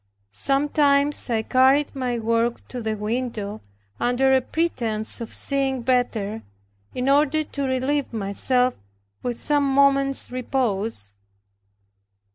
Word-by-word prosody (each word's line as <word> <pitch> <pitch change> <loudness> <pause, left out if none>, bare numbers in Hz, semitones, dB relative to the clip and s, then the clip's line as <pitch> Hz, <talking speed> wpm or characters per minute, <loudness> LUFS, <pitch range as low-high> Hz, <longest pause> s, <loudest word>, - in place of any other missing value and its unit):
Sometimes 280 - +2
I 225 -2 0
carried 265 +4 +3
my 250 -3 -2
work 230 +1 -1
to 250 - -6
the 220 -1 -2
window, 215 -1 -3 0.4
under 260 +2 +2
a 260 - +4
pretense 235 -9 -2
of 230 - -7
seeing 270 -3 -1
better, 225 -4 0 0.5
in 250 +1 -2
order 295 +2 +3
to 285 -1 -5
relieve 260 +2 -1
myself 245 +4 +2 0.4
with 240 -1 -4
some 295 -1 +1
moment's 275 -1 +2
repose. 225 - -2
255 Hz, 110 wpm, -23 LUFS, 230-275 Hz, 0.5 s, a